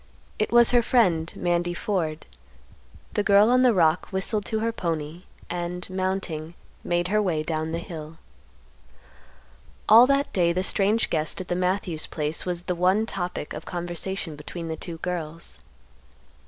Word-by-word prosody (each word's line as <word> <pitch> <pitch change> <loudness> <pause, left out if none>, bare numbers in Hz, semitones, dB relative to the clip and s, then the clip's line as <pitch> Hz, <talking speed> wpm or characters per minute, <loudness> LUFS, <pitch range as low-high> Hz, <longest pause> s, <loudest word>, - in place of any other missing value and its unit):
It 215 - 0
was 235 0 +6
her 245 -1 +5
friend, 180 -10 +2
Mandy 175 0 0
Ford. 165 -6 -2 0.9
The - - +1
girl 205 +2 +5
on 255 0 +5
the 255 -1 +6
rock 170 -4 +3
whistled 200 +2 -2
to 220 - -1
her 230 +1 0
pony, 165 -3 -4 0.2
and, 175 0 -3
mounting, 185 -4 -3 0.3
made 175 0 0
her 210 +1 +3
way 165 -6 0
down 160 0 -2
the 165 - -1
hill. 160 -2 -8 1.7
All 230 +4 +9
that 275 +1 +1
day 170 -2 +3
the 185 +2 0
strange 205 +3 +1
guest 155 +2 0
at 185 - -7
the 175 - 0
Matthews 180 -3 -1
place 155 +3 -3
was 175 -1 -3
the 180 - -1
one 185 +5 +2
topic 175 -7 -4
of - - -7
conversation 175 -1 -4
between 165 +3 -7
the 160 - -2
two 165 +1 -6
girls. 170 -1 -5
175 Hz, 155 wpm, -25 LUFS, 165-200 Hz, 1.7 s, All